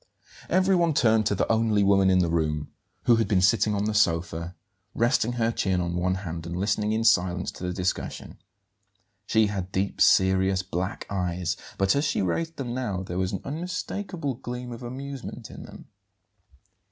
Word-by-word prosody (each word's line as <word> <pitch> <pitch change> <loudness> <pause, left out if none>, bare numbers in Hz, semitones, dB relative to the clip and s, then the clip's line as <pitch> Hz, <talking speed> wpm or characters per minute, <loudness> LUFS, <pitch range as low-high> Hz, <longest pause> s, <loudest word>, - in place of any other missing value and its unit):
Everyone 185 -4 +3
turned 110 -4 +3
to 105 - +1
the - - 0
only 110 -2 +2
woman 100 -1 +4
in 95 - +4
the 90 -2 +3
room, 75 -3 -1 0.3
who 120 -2 +5
had 115 - +1
been 100 -3 +3
sitting 105 +2 +3
on 100 +1 0
the 110 - -1
sofa, 85 -3 0 0.4
resting 120 0 +2
her 115 -1 +1
chin 95 -5 0
on 85 -1 -2
one 90 +1 0
hand 85 -3 -6
and 85 +1 -4
listening 105 +2 0
in 110 +1 0
silence 90 -5 +2
to - - -11
the 90 - -1
discussion. 90 0 -3 0.9
She 110 0 +4
had 95 -3 -3
deep, 95 +1 -2
serious 95 0 +4
black 90 +1 -4
eyes, 90 -3 -2 0.2
but 95 +3 +2
as 140 - +1
she 145 - 0
raised 165 - -2
them 125 -3 -4
now 105 -8 -2
there 90 -1 -4
was 95 0 0
an 95 - -4
unmistakable 180 0 -4
gleam 125 0 -6
of 115 - -8
amusement 135 +2 -7
in - - -9
them. - - -12
100 Hz, 175 wpm, -26 LUFS, 90-120 Hz, 0.9 s, who